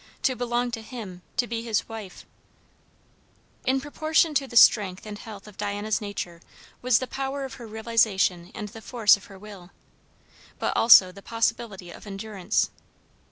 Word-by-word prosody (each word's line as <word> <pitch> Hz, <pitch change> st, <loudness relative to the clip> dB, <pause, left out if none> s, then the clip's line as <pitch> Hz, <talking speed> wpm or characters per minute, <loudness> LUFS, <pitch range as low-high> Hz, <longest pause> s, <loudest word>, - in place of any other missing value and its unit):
to 260 Hz, -, +2 dB
belong 245 Hz, 0 st, -1 dB
to 225 Hz, -1 st, -4 dB
him, 215 Hz, -6 st, -8 dB, 0.2 s
to 245 Hz, -, +2 dB
be 230 Hz, -1 st, -4 dB
his 225 Hz, -2 st, -1 dB
wife 220 Hz, -5 st, -9 dB, 1.4 s
In 265 Hz, +1 st, +3 dB
proportion 310 Hz, +3 st, +1 dB
to 275 Hz, -1 st, +1 dB
the 240 Hz, -, -11 dB
strength 195 Hz, -5 st, +5 dB
and 210 Hz, -1 st, -7 dB
health 210 Hz, -2 st, -10 dB
of 210 Hz, -, -14 dB
Diana's 205 Hz, +1 st, -2 dB
nature 180 Hz, -5 st, -6 dB, 0.4 s
was 250 Hz, -2 st, +4 dB
the 255 Hz, -, -2 dB
power 270 Hz, +1 st, -4 dB
of 265 Hz, -, -8 dB
her 235 Hz, -, -8 dB
realization 215 Hz, -5 st, +1 dB
and 210 Hz, -1 st, -5 dB
the 225 Hz, +1 st, -11 dB
force 225 Hz, -3 st, +4 dB
of 200 Hz, -, -13 dB
her 195 Hz, -, -13 dB
will. 195 Hz, -3 st, -12 dB, 0.9 s
But -, -, -1 dB
also 195 Hz, -5 st, +8 dB
the 200 Hz, +2 st, -13 dB
possibility 225 Hz, -5 st, -2 dB
of 210 Hz, -, -12 dB
endurance. 200 Hz, -1 st, -1 dB
220 Hz, 160 wpm, -26 LUFS, 200-240 Hz, 1.4 s, also